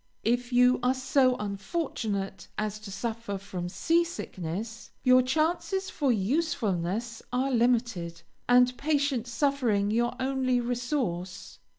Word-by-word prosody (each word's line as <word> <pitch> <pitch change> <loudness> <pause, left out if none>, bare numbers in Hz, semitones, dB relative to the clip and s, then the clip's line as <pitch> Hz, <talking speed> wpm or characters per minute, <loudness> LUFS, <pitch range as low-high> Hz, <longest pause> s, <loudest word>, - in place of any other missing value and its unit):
If 245 +2 0
you 250 +1 +5
are 250 +2 +2
so 260 -1 +3
unfortunate 205 - -3
as 215 0 -2
to 215 -2 -9
suffer 225 -1 -4
from 180 -2 -5
sea 335 - +2
sickness, 220 - -6
your 255 0 +6
chances 335 +8 0
for 280 -4 +1
usefulness 225 - -1
are 260 +2 0
limited, 230 -8 0 0.3
and 250 0 +5
patient 285 -5 0
suffering 235 -5 +1
your 240 +2 +1
only 260 -1 +1
resource. 235 - -3
245 Hz, 115 wpm, -28 LUFS, 205-265 Hz, 0.3 s, your